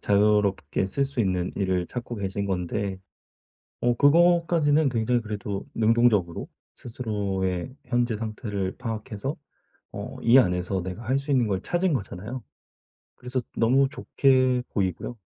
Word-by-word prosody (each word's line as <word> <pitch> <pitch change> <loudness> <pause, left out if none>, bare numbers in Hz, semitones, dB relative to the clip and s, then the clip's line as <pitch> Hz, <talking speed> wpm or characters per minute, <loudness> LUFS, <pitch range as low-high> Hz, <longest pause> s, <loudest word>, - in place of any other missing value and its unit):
자유롭게 100 -5 +2
쓸 140 +9 0
수 135 -3 -2
있는 90 -3 0
일을 95 -3 0
찾고 120 +1 -6
계신 100 0 -3
건데. 95 +1 -2 0.9
어 120 0 +3
그것까지는 160 -1 +4
굉장히 120 0 +1
그래도 105 -2 -5
능동적으로 110 -6 +2 0.3
스스로의 100 -3 -3
현재 120 -2 +1
상태를 105 -3 -4
파악해서 115 +2 -4 0.6
어 - - -6
이 120 +3 +7
안에서 90 -3 +1
내가 95 +5 -6
할 130 +4 +1
수 140 +1 -5
있는 125 -4 +3
걸 95 -2 -1
찾은 175 - 0
거잖아요. 110 +1 -4 0.7
그래서 125 +1 -3 0.2
너무 130 +4 +4
좋게 130 -3 +2
보이고요. 95 +4 -2
110 Hz, 295 characters per minute, -26 LUFS, 95-130 Hz, 0.9 s, 이